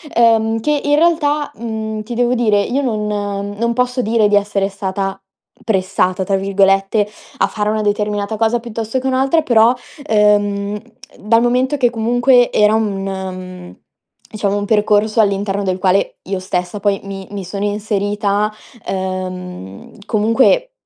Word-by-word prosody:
ehm, 225 -1 +3
che 295 +4 +1
in 290 0 +3
realtà, 300 -2 +1
mhmm, 220 -1 -4
ti 240 +2 -6
devo 245 +1 +2
dire 215 -4 +2
io 260 +7 -1
non 215 -5 -1 0.5
non 235 0 +1
posso 250 +1 0
dire 225 -2 +2
di 205 - +2
essere 200 -1 +1
stata 195 0 -3 0.4
"pressata", 190 -2 0
tra 195 +1 0
virgolette, 195 +1 +2 0.3
a - - +3
fare 210 -1 -2
una 215 0 0
determinata 210 0 -1
cosa 225 +2 +1
piuttosto 230 +1 -4
che 260 - -3
un'altra 265 +5 +2
però, 235 -3 +4 0.3
ehm, 205 -2 +2 0.4
dal 230 +3 +3
momento 255 +4 +1
che 250 -3 +3
comunque 245 +2 +3
era 210 0 +4
un 210 -3 -1
mhmm, 185 -2 -6 0.6
diciamo 205 -2 -1
un 205 - -2
percorso 210 +1 +2
all'interno 200 -1 0
del 185 -1 -1
quale 190 +1 +1
io 195 - -1
stessa 180 +1 -3
poi 200 0 0
mi 195 -1 -7
mi 200 -1 -5
sono 200 +3 -4
inserita, 205 0 -1 0.3
ehm, 185 - -5
comunque 245 - +2
210 Hz, 145 wpm, -17 LUFS, 195-235 Hz, 0.6 s, però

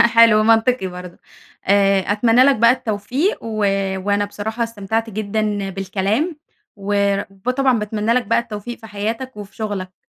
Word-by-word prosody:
حلو 230 -2 +6
منطقي 225 -1 +3
برضه 180 -1 -9 0.5
آآ 195 0 +4
أتمنى 230 +4 +4
لَك 275 0 +5
بقى 230 +2 +5
التوفيق 250 - -1
و 225 -1 -5 0.5
وأنا 205 0 +1
بصراحة 220 +3 -4
استمتعت 225 0 -3
جدًا 210 -1 -2
بالكلام. 200 - -1 0.4
وب 200 +1 -1
طبعًا 260 -4 +3
باتمنى 210 +1 -1
لك 250 0 +1
بقى 230 - +3
التوفيق 235 0 -7
في 220 - -11
حياتك 220 +4 -4
وفي 205 -1 -10
شغلك. 195 -4 -5
215 Hz, 140 wpm, -19 LUFS, 200-230 Hz, 0.5 s, حلو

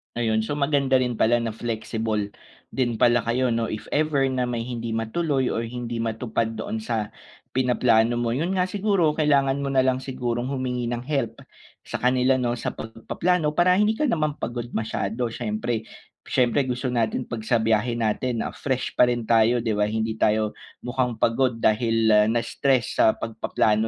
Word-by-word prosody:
Ayun, 110 -2 +1
so 145 +6 -3
maganda 140 -2 +2
rin 125 -1 -1
pala 120 +2 +3
na 115 -2 -3
flexible 110 -2 -3 0.3
din 120 -4 -2
pala 120 -1 +4
kayo, 125 +2 +1
'no? 115 -1 -1
If 110 - -6
ever 145 -2 +2
na 130 -1 -1
may 120 -1 -2
hindi 120 -2 -4
matuloy 130 +5 0
or 115 - -1
hindi 120 0 -4
matupad 115 0 -2
doon 110 0 -4
sa 110 -2 -2 0.5
pinaplano 120 -2 +3
mo. 120 0 0
'Yon 165 +7 -1
nga 180 - +2
siguro 190 -6 +1
kailangan 140 -2 +2
mo 140 - -2
na 135 - +3
lang 130 0 +1
sigurong 125 -1 -3
humingi 130 -2 -2
ng 120 - -2
help 130 -7 -2 0.5
sa - - -5
kanila 125 +1 +2
'no 120 -2 -1
sa - - -3
pagpaplano 150 +8 -1
para 175 +2 +4
hindi 210 +1 +3
ka 305 - -1
naman 155 - +1
pagod 120 -4 -4
masyado 110 +1 -2
siyempre. 110 0 -3 0.4
Siyempre 130 +2 +2
gusto 125 0 -2
natin 115 +1 0
'pag 115 -3 -6
sa 120 - +3
biyahe 115 +1 +1
natin, 115 +1 -1
ah, - - -4
fresh 130 -2 -2
pa 125 - +4
rin 120 -1 -1
tayo, 115 +1 +3
'di 115 - 0
ba? 105 0 +1
Hindi 110 +1 -2
tayo 110 0 +2 0.3
mukhang 125 -1 -1
pagod 120 +2 +1
dahil 110 -1 +3
na-stress 120 +2 0
sa - - +6
pagpaplano 110 -1 0
120 Hz, 175 wpm, -24 LUFS, 115-130 Hz, 0.5 s, sa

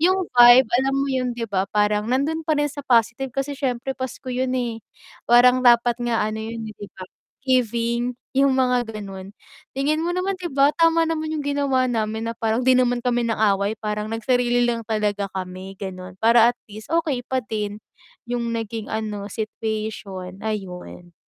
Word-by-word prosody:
yung 370 +2 +2
vibe 240 0 +8 0.2
alam 270 - 0
mo 275 0 0
yun, 255 -1 0
di 235 - -2
ba, 195 -1 0
parang 210 0 +1
nandun 310 +5 0
pa 315 - +2
rin 295 - +1
sa 285 +1 -8
positive, 235 +2 +2
kasi 275 +1 -2
syempre 265 -1 -2
pasko 260 0 -6
yun, 255 +1 -1
eh, 235 -3 -3 0.5
parang 250 +1 +6
dapat 240 0 +5
nga 230 -3 0
ano 215 - -4
yun, 225 +1 -5
eh 215 - -13
di 205 - -8
ba 185 - -8 0.4
giving, 235 -1 +1 0.2
yung 275 0 +4
mga 250 -2 +2
ganon. 195 -2 -8 0.4
Tingin 295 +4 0
mo 350 - -1
naman 370 +2 -1
di 360 -2 -6
ba 275 +1 +4
tama 330 0 +3
naman 315 -1 -2
yung 310 - -2
ginawa 280 -3 +1
namin, 220 -1 -2
na - - -6
parang 225 +1 0
di 260 - +6
naman 245 -1 +2
kami 245 -1 +1
nang-away, 205 -2 +1
parang 210 -1 -2
nagsarili 245 +1 +1
lang 230 -1 -2
talaga 210 -2 -1
kami 185 0 -6
ganon, 185 -2 -7
para 230 +1 +6
at 245 - -38
least 215 +7 -9
okay 305 -7 0
pa 260 +1 -1
din 210 -1 -4 0.5
yung 240 -1 -2
naging 225 -1 -5
ano 210 -2 -3
situation, 215 -4 -5
ayun. 180 -4 -6
235 Hz, 180 wpm, -22 LUFS, 215-260 Hz, 0.5 s, vibe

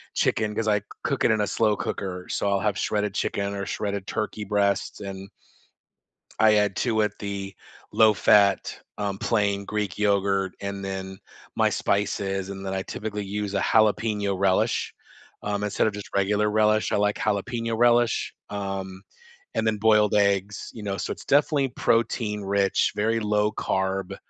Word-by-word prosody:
chicken 105 -1 +1
'cause 110 -1 -1
I 105 -1 +2 0.2
cook - - -1
it - - +5
in 110 -1 +2
a 105 - 0
slow 110 0 +2
cooker, 90 -2 -4
so 100 - 0
I'll 100 - +2
have 105 -1 0
shredded 105 -2 -1
chicken 100 -1 -1
or 100 - -3
shredded 100 -2 -3
turkey 105 0 -3
breasts 100 0 0
and 95 -1 -7 1.1
I 110 -1 +6
add 105 -2 +2
to 110 -3 +1
it 105 -1 0
the 100 -1 -5 0.4
low-fat, 105 -2 +4 0.2
um, 100 -2 -2
plain 100 -3 0
Greek 105 -3 -3
yogurt 100 -2 +1
and 100 0 -4
then 95 0 -5 0.4
my - - +3
spices, 95 -1 -1
and 95 0 -7
then 95 - -3
I 95 - -1
typically 105 0 -5
use 100 0 -3
a - - +2
jalapeño 105 -2 +2
relish, 95 -1 +1 0.5
um, 105 0 -2
instead 105 +1 +1
of 110 - -1
just 105 0 -8
regular 105 +2 +2
relish- 110 0 +2
I - - +2
like 105 0 +1
jalapeño 115 +2 -1
relish- 120 -1 +3 0.2
um, 95 -2 -5 0.5
and 110 - 0
then 110 -1 +1
boiled 105 -1 +4
eggs, 100 0 +1
you 110 - -8
know, 100 -1 -3
so - - -3
it's - - -7
definitely 145 -1 +3
protein-rich, 105 -5 +1
very 110 +2 +1
low-carb, 105 -3 -1
105 Hz, 160 wpm, -25 LUFS, 100-105 Hz, 1.1 s, I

